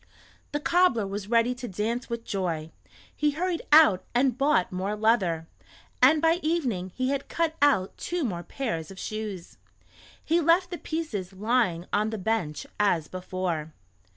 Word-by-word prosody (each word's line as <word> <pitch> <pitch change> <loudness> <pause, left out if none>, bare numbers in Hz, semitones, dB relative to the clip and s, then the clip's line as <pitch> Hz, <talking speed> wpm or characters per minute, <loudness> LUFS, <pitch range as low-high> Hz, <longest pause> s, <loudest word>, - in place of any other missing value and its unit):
The 290 - -1
cobbler 320 - +3
was 200 +1 -5
ready 235 +1 +3
to 245 0 -7
dance 225 +5 -3
with 235 -1 -4
joy. 165 -5 -3 0.4
He 300 - +2
hurried 355 -1 -1
out 300 -12 +7
and 255 -1 +3
bought 275 -8 +2
more 190 +3 -2
leather, 205 -7 +1 0.6
and 315 0 +5
by 330 +1 +4
evening 250 - -1
he 255 0 0
had 275 0 -2
cut 330 -1 0
out 270 -10 +3
two 350 -2 -2
more 180 -9 -2
pairs 175 - -4
of 195 - -11
shoes. 210 - -6 0.7
He 335 +2 +2
left 340 +3 +3
the 350 - -5
pieces 220 - -4
lying 205 -4 +1
on 210 +1 +2
the 220 - -4
bench 185 -7 -2
as 175 -7 +2
before. 180 -4 -4
220 Hz, 155 wpm, -27 LUFS, 185-290 Hz, 0.7 s, out